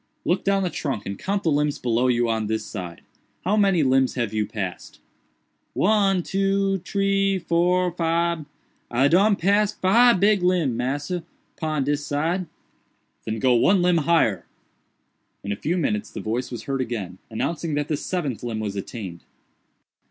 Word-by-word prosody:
Look 180 - +1
down 195 0 +2
the 180 - -1
trunk 130 -9 -3
and 100 - -4
count 200 +1 -2
the 160 - +2
limbs 145 0 +1
below 120 +1 +1
you 120 -1 +2
on 110 -2 -1
this 110 0 -2
side. 90 -4 -7 0.4
How 200 +3 +2
many 195 -6 +3
limbs 130 0 +2
have 120 -4 -2
you 105 -1 0
passed?" 95 -4 -6 0.7
"One, 195 -2 +2
two, 195 0 0
tree, 195 +1 +1
four, 180 +1 +1
fibe—I 165 -6 -1
done 200 +7 +4
pass 205 +3 +2
fibe 230 +3 +5
big 205 0 +3
limb, 175 -8 +2
massa, 145 +8 -2 0.3
pon 155 -3 -1
dis 145 +1 -1
side." 165 +6 -1 0.8
"Then 110 0 -2
go 125 +3 +3
one 180 +10 +4
limb 180 -1 +3
higher." 155 - +2 1.0
In 100 - -4
a - - 0
few 160 - -2
minutes 105 - -1
the - - -7
voice 120 +4 -2
was 120 - -6
heard 135 -1 -2
again, 105 -7 -4
announcing 155 +7 -2
that 145 0 -1
the 155 - 0
seventh 145 - -3
limb 115 -3 -4
was 105 -2 -3
attained. 95 -4 -6
155 Hz, 160 wpm, -23 LUFS, 120-185 Hz, 1.0 s, fibe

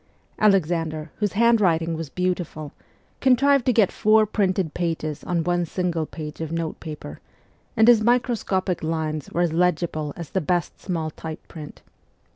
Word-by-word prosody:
Alexander, 165 -6 +1
whose 205 -3 -1
handwriting 200 -8 +3
was 160 -2 -5
beautiful, 175 -4 -3 0.5
contrived 270 +1 +3
to - - +6
get 220 -5 +3
four 215 +1 +4
printed 190 -6 0
pages 160 -3 -3
on 175 -2 0
one 175 0 +1
single 170 -2 -2
page 155 -1 -8
of 160 -1 -4
notepaper, 160 - -5 0.6
and 220 +1 +5
his 240 -3 +7
microscopic 215 -6 +1
lines 155 -2 -2
were 175 - -1
as 170 -2 +1
legible 170 -3 0
as 170 -3 -7
the 190 - 0
best 175 +2 -1
small 165 -4 -3
type 160 +1 -8
print. 150 -3 -10
175 Hz, 145 wpm, -23 LUFS, 160-200 Hz, 0.6 s, his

